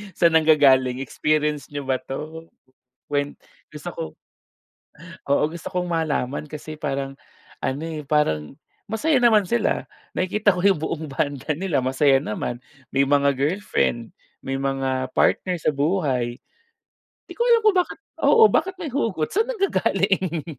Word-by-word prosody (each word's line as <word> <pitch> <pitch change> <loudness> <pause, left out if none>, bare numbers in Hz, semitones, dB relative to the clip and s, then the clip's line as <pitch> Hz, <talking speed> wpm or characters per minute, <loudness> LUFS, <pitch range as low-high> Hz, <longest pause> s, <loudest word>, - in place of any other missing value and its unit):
Sa'n 165 -2 +5
nanggagaling, 135 -5 +4
experience 150 +1 0
niyo 145 -1 -6
ba 130 -1 0
'to?" 160 +4 -7 0.6
Kwen 145 0 -1 0.4
gusto - - -6
ko - - -5 1.3
oo, 140 - +3
gusto 170 -1 -7
kong 180 0 -1
malaman 150 -3 -1
kasi 150 +1 -8
parang 135 -2 -3 0.4
ano 135 +3 -1
eh, 160 -2 -5
parang 80 - 0 0.3
masaya 260 +7 +1
naman 225 -4 +5
sila, 235 +5 0 0.3
nakikita 205 +2 +2
ko 180 - -2
'yung 195 -5 +4
buong 160 -1 -3
banda 140 +1 -2
nila 170 -3 0
masaya 135 +1 +3
naman, 120 +1 -4 0.4
may 135 - +5
mga 140 0 +3
girlfriend, 140 - -1 0.3
may 135 - -3
mga 135 -1 -1
partner 180 -1 +2
sa 155 - +1
buhay, 140 -6 0 0.9
di - - -9
ko - - 0
alam 470 -1 +6
kung 425 -3 +4
bakit 360 - -1 0.2
oo 460 - +5
bakit 380 - +1
may 335 -6 -5
hugot, 215 - -1
saan 440 +4 +2
nanggagaling? 190 - 0
150 Hz, 140 wpm, -23 LUFS, 135-185 Hz, 1.3 s, alam